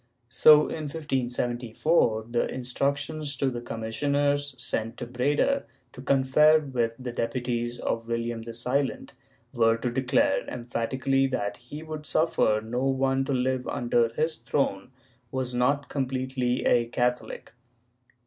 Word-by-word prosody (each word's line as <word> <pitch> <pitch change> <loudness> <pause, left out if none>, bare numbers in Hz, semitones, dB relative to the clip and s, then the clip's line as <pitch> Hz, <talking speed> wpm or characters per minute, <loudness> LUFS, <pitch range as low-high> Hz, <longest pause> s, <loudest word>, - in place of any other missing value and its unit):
So, 150 +5 +7
in 155 0 -3
1574, 125 -3 0
the 120 - 0
instructions 140 +3 -2
to 135 0 +1
the 120 -1 -5
commissioners 140 +5 -1
sent 115 -2 -3
to 120 - -5
Breda 145 - +1 0.3
to 130 - -10
confer 140 +4 +4
with 125 -6 -1
the 130 -1 -5
deputies 120 0 -2
of 115 0 -3
William 115 0 -2
the 115 0 -8
Silent, 130 +3 -1 0.4
were 115 -1 +3
to 120 +1 -2
declare 130 +1 +2
emphatically 130 +3 0
that 100 -6 -2
he 145 +6 -9
would 155 -1 -7
suffer 110 -9 +2
no 120 +3 -2
one 135 0 +1
to 140 - -3
live 130 0 0
under 120 -1 +1
his 155 +6 -1
throne 125 -7 -1 0.4
who 130 - -6
was 125 -1 -2
not 140 +4 +1
com 135 -3 -2
pletely 130 -1 -1
a 120 -1 +3
Catholic. 125 +1 -2
130 Hz, 140 wpm, -27 LUFS, 120-140 Hz, 0.4 s, So